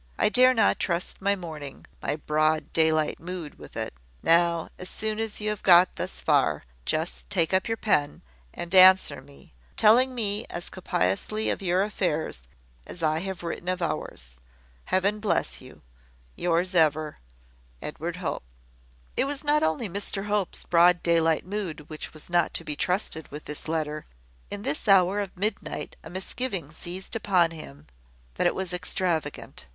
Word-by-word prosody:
I - - +3
dare 255 +3 +6
not 220 -3 +3
trust 175 +1 -2
my 200 +1 +2
morning 155 -7 -8 0.2
my - - -1
broad 155 0 0
daylight 160 -1 +2
mood 175 -3 -7
with - - -11
it. - - -3 0.3
Now, 170 0 +3
as 185 - -5
soon 215 0 -3
as 225 -1 -2
you 215 0 -1
have 210 - -5
got 180 0 +6
thus - - -4
far, - - +2 0.2
just - - -2
take 165 +2 +1
up 190 0 +2
your 225 0 -1
pen, 150 -11 0 0.3
and 175 +1 -6
answer 185 -6 +7
me, 140 - -18 0.2
telling 250 +4 +5
me 210 -2 -1
as 175 - -6
copiously 185 - -1
of - - -3
your 185 0 +2
affairs 175 - -2 0.5
as 175 - -7
I 155 0 +2
have 190 -1 -5
written 170 +1 -4
of 185 0 -1
ours. 105 - -4 0.5
Heaven 200 +3 +1
bless 70 - -1
you. - - -15 0.5
"Yours 175 +2 0
ever, 155 -2 +2 0.6
"Edward 165 - -5
Hope." 170 -6 -3 0.7
It - - +2
was 280 +1 -3
not 295 +1 +3
only 160 +8 0
Mr 200 +1 -3
Hope's 205 -3 -1
broad 175 0 +4
daylight 165 -2 +2
mood 180 -7 -5
which 155 - -6
was 155 - -9
not 175 0 +1
to - - -1
be 150 - -4
trusted 180 -2 -1
with 150 +2 -9
this 150 +1 -6
letter. 155 -1 -2 0.4
In 205 0 -6
this 150 - -3
hour 195 0 +5
of 195 -2 -5
midnight 205 +2 -3
a - - -9
misgiving 190 - -4
seized 180 +6 -5
upon 185 -6 +2
him 75 - -10 0.5
that - - +1
it - - 0
was 185 -1 -3
extravagant. 175 - -2
175 Hz, 165 wpm, -26 LUFS, 155-200 Hz, 0.7 s, answer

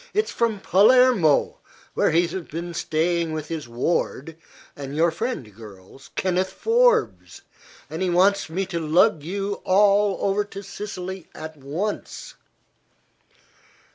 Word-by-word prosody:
"It's 425 +1 +1
from 225 -3 0
Palermo, 205 - +4 0.3
where - - +2
he 170 +2 +3
has 175 0 -6
been 170 +2 -6
staying 165 0 -1
with 155 -1 -5
his 160 -5 -5
ward 145 +4 -2 0.4
and 140 0 -7
your 165 +2 +3
friend, 165 - -5
girls 105 +3 -14
Kenneth 185 0 0
Forbes, 470 0 +1 0.4
and - - -6
he 185 - +1
wants 190 +1 +2
me 190 +4 -2
to 175 -3 -4
lug 160 0 +3
you 200 +5 -4
all 200 +1 +3
over 200 +1 +1
to 200 0 -10
Sicily 190 -2 -7
at 160 0 -8
once." 155 +9 -5
180 Hz, 130 wpm, -23 LUFS, 155-200 Hz, 0.4 s, Palermo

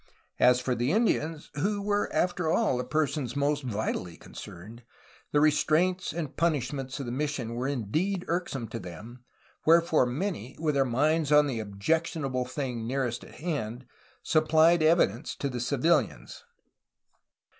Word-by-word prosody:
As 125 0 +5
for 125 0 -1
the 120 +3 0
Indians, 165 -7 0
who 200 +7 -1 0.3
after 180 -2 0
all 215 - +2
were - - 0
the 125 - -8
per 155 +3 +2
sons 135 -2 -4
most 145 +1 +1
vitally 105 - -3
concerned, 110 +8 -11 0.5
the 145 - +3
restraints 155 +5 +2
and 160 -5 -5
punishments 135 -4 -1
of 135 - -4
the 120 - -4
mission 135 -3 -2
were 125 +3 -2
indeed 155 - -1
irksome 165 -8 -2
to 115 - -5
them, 115 +8 -10 0.4
wherefore 165 -5 +4
many, 135 - -3
with 155 -2 +1
their 135 -1 +3
minds 150 +5 +1
on 150 0 +6
the 130 -5 -2
objectionable 130 +5 -1
thing 125 -4 -4
nearest 125 -2 -2
at - - -14
hand, 130 -7 -4 0.4
supplied 160 +2 +4
evidence 155 - +2
for 140 - -1
the 125 -2 -4
civilians. 140 - 0
140 Hz, 145 wpm, -28 LUFS, 125-160 Hz, 0.5 s, on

